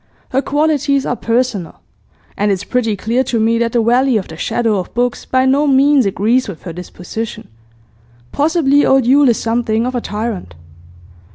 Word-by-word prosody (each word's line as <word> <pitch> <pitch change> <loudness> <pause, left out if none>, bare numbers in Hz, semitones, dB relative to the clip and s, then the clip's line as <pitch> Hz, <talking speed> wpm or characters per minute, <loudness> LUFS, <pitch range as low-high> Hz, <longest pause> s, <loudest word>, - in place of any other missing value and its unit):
Her 265 - 0
qualities 290 -2 0
are - - -1
personal. 230 -5 -2 0.6
And 205 0 0
it's 195 0 -2
pretty 225 -2 -1
clear 230 +6 0
to 235 -2 -1
me 230 +1 +2
that 235 -1 -1
the 235 -2 +2
valley 245 +1 +2
of 195 - -4
the 160 - -8
shadow 220 +4 -1
of 180 - -6
books 245 0 -1
by 260 0 +1
no 280 +3 +2
means 275 -2 +4
agrees 225 +7 +1
with 195 -6 -9
her 175 - -7
disposition. 180 +5 -7 0.8
Possibly 290 -2 +2
old 265 -2 +3
Yule 275 +2 +5
is 235 - +2
something 230 0 -1
of 255 - -3
a 245 - -2
tyrant. 210 - -5
235 Hz, 175 wpm, -16 LUFS, 215-265 Hz, 0.8 s, Yule